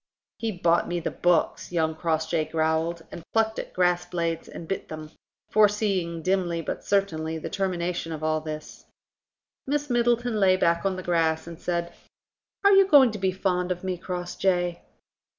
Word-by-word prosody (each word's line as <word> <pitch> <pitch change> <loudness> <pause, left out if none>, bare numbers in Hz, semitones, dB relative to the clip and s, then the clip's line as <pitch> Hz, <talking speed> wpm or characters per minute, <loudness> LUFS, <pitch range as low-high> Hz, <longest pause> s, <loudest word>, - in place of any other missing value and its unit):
"He 225 -1 -1
bought 175 -3 +2
me 175 0 -1
the 165 - -3
books," 175 -1 +1
young 160 -2 +1
Crossjay 160 0 0
growled, 160 +1 0
and - - -7
plucked 220 0 +1
at - - -6
grass 180 -1 +2
blades 170 -2 -3
and 165 - -9
bit 195 - -3
them, 155 -1 -8 0.4
foreseeing 200 -6 +2
dimly 185 -2 0
but - - -4
certainly 160 -5 0
the 160 - -6
termination 175 -3 -2
of 155 -1 -5
all 155 0 +1
this. 155 -1 -8 0.8
Miss 290 0 -1
Middleton 240 -1 +2
lay 185 -2 +5
back 170 +1 +2
on 190 - -1
the 185 - -6
grass 165 -2 +1
and 170 0 -9
said: 170 -1 -2 0.7
"Are 400 - +6
you 390 -1 +6
going 275 - +7
to 210 - -6
be 190 0 +1
fond 180 -1 -1
of 180 0 -3
me, 185 -1 -1
Crossjay?" 175 0 -1
175 Hz, 170 wpm, -26 LUFS, 165-195 Hz, 0.8 s, going